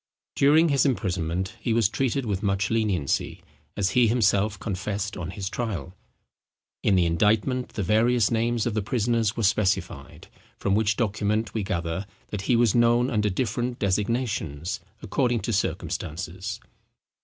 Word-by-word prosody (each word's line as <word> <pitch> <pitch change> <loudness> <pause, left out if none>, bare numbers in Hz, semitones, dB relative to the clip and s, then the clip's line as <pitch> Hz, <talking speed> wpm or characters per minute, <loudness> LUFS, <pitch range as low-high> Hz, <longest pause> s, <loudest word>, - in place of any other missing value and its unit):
During 155 +4 +5
his 140 -3 +3
imprisonment 95 - -1
he 115 - -1
was 115 -3 +4
treated 130 +3 -1
with 100 -3 -2
much 100 0 0
leniency, 105 -10 0 0.3
as 100 -1 +1
he 125 +1 +4
himself 105 -2 +2
confessed 100 0 -3
on 90 -2 -5
his 95 +1 -5
trial. 100 -6 -4 0.9
In 100 - +3
the 90 -2 +3
indictment 110 +9 +1
the 105 - -2
various 115 +3 +3
names 115 0 +1
of 120 - -1
the 110 - 0
prisoners 115 0 0
were 115 - -1
specified; 100 -2 -1 0.3
from 100 - 0
which 105 0 +2
document 110 -1 0
we 110 - -1
gather 90 -1 -3 0.2
that 105 - -4
he 125 - +5
was 115 -3 +3
known 120 +2 +3
under 105 -2 +1
different 120 +4 -2
designations 100 - -1 0.2
according 120 -4 0
to 115 - -2
circumstances. 95 +2 -3
105 Hz, 145 wpm, -25 LUFS, 95-120 Hz, 0.9 s, During